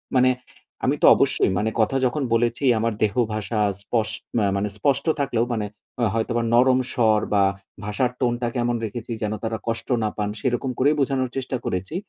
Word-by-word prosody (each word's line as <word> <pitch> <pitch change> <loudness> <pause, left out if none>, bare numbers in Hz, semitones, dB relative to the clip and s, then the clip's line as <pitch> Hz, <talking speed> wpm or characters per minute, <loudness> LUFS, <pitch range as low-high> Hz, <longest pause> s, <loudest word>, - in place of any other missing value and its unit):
মানে 130 0 +5 0.6
আমি - - +2
তো - - +8
অবশ্যই - - +2
মানে 105 +4 +1
কথা 110 +5 +1
যখন 140 +4 0
বলেছি, 120 +4 +1 0.2
আমার 115 0 0
দেহ 105 -2 +2 0.2
ভাষা 110 +1 -2 0.2
স্পস 110 0 -1 0.3
মা 105 - +2
মানে 100 +1 -1
স্পষ্ট 140 +6 +1
থাকলেও 120 -4 +1
মানে 110 -2 -1 0.3
হ - - +1
হয়তোবা 115 +1 0
নরম 130 +2 +5
স্বর 110 -4 +3
বা 100 -1 +4 0.4
ভাষার 105 +5 0
টোনটা 120 -1 0
কেমন 120 0 0
রেখেছি 115 +2 -6
যেন 105 -1 -1
তারা 110 0 -2
কষ্ট 115 0 -2 0.2
না 105 - +1
পান। 105 -1 -1
সেরকম 130 +2 -1
করেই 145 +4 +4
বোঝানোর 130 -1 0
চেষ্টা 130 0 -2
করেছি। 95 - -3
120 Hz, 180 wpm, -23 LUFS, 110-130 Hz, 0.6 s, তো